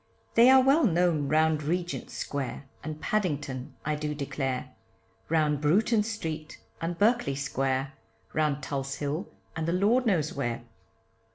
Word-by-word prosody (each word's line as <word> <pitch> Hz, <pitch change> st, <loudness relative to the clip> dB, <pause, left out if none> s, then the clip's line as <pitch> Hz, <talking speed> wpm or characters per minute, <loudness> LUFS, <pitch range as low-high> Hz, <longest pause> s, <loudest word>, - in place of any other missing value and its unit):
They 235 Hz, +2 st, +7 dB
are 265 Hz, 0 st, +7 dB
well 275 Hz, +5 st, +5 dB
known 170 Hz, -6 st, +2 dB
round 155 Hz, +1 st, +3 dB
Regent 175 Hz, +3 st, -2 dB
Square. 140 Hz, -1 st, -4 dB, 0.2 s
And 155 Hz, 0 st, -5 dB
Paddington 150 Hz, -11 st, -2 dB
I 155 Hz, -, +1 dB
do 150 Hz, 0 st, -3 dB
declare, 135 Hz, -2 st, -3 dB, 0.6 s
Round 150 Hz, -3 st, +2 dB
Bruton 210 Hz, +9 st, +3 dB
street, 165 Hz, -8 st, -5 dB, 0.2 s
and 165 Hz, +1 st, -2 dB
Berkeley 215 Hz, -, +2 dB
Square, 135 Hz, -1 st, -1 dB, 0.4 s
Round 150 Hz, -2 st, 0 dB
Tulse 135 Hz, 0 st, -3 dB
Hill, 150 Hz, +7 st, -3 dB, 0.3 s
and 160 Hz, 0 st, -2 dB
the 170 Hz, -, +1 dB
lord 225 Hz, +7 st, +3 dB
knows 160 Hz, -8 st, +1 dB
where. 120 Hz, -3 st, -2 dB
155 Hz, 140 wpm, -28 LUFS, 140-180 Hz, 0.6 s, They